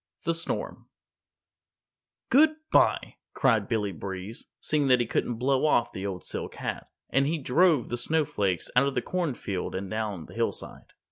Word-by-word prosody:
THE 165 - +1
STORM 165 0 -3 1.4
"Goodby," 310 +3 +3 0.2
cried 115 -7 +3
Billy 105 -4 0
Breeze, 95 +4 -6
seeing 150 -2 +1
that 125 -1 +5
he 120 - +1
couldn't 120 +1 -1
blow 130 +3 +1
off 120 -5 +2
the 95 +1 -4
old 95 -2 -5
silk - - -3
hat, - - -4 0.2
and 135 +1 +3
he 165 +2 0
drove 150 0 +3
the 120 - -2
Snow 155 +5 +2
Flakes 95 -8 -1
out 130 +3 +5
of 140 - -2
the - - 0
Corn 175 -7 -1
Field 95 -5 -4
and 95 0 -4
down 105 -6 -3
the - - -13
hillside. - - -4
125 Hz, 165 wpm, -27 LUFS, 100-155 Hz, 1.4 s, that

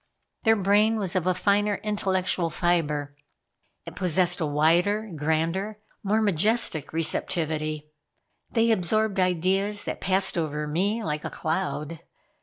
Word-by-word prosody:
Their 225 0 +5
brain 210 +2 +3
was 195 -2 -3
of 185 -1 0
a 185 - +2
finer 205 +2 +1
intellectual 190 -4 0
fiber. 150 -5 -1 0.7
It - - -9
possessed 180 0 +1
a 160 - 0
wider, 175 +8 +1
grander, 165 +7 -1 0.2
more 215 +2 +1
majestic 205 - +2
receptivity. 155 -2 -2 0.6
They 230 -1 +2
absorbed 215 +1 +1
ideas 190 +3 +1
that - - -5
passed 190 -1 +2
over 150 -2 -2
me 195 +9 -1
like 150 -3 -3
a - - -3
cloud. 160 -1 -3
185 Hz, 125 wpm, -25 LUFS, 160-205 Hz, 0.7 s, Their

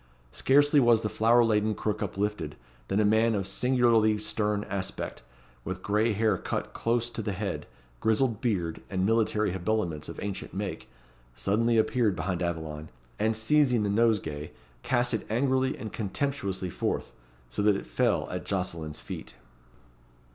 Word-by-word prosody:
Scarcely 145 - +4
was 120 -3 +4
the 105 - 0
flower 115 +2 +5
laden 110 -1 +2
crook 105 0 -2
uplifted, 105 -5 -2 0.3
than 95 - +1
a 105 - +4
man 110 +2 +3
of 100 -2 -1
singularly 115 0 +3
stern 105 -1 -1
aspect, 100 -2 -4 0.4
with 95 +4 -5
gray 105 +4 +2
hair 110 +1 +1
cut - - -3
close 120 0 0
to 120 - -4
the 105 -2 -2
head, 95 0 -4 0.3
grizzled 110 0 +1
beard, 90 -9 -1
and 95 -1 0
military 110 -2 +2
habiliments 90 -4 -1
of - - -7
ancient 100 -2 -5
make, 100 -8 -4 0.5
suddenly 115 - +2
appeared 110 -2 +2
behind 90 +2 -2
Aveline, 80 -3 -3 0.3
and 110 +1 +1
seizing 125 0 +3
the 100 - 0
nosegay, 100 -10 +1 0.3
cast 120 -1 +1
it 110 - -2
angrily 130 +3 +1
and 110 - -7
contemptuously 100 -4 -2
forth; - - -2 0.4
so - - -2
that 105 -1 +4
it - - -4
fell 120 -4 +1
at 90 0 -4
Jocelyn's 85 -5 -3
feet. - - -8
105 Hz, 150 wpm, -28 LUFS, 95-115 Hz, 0.5 s, flower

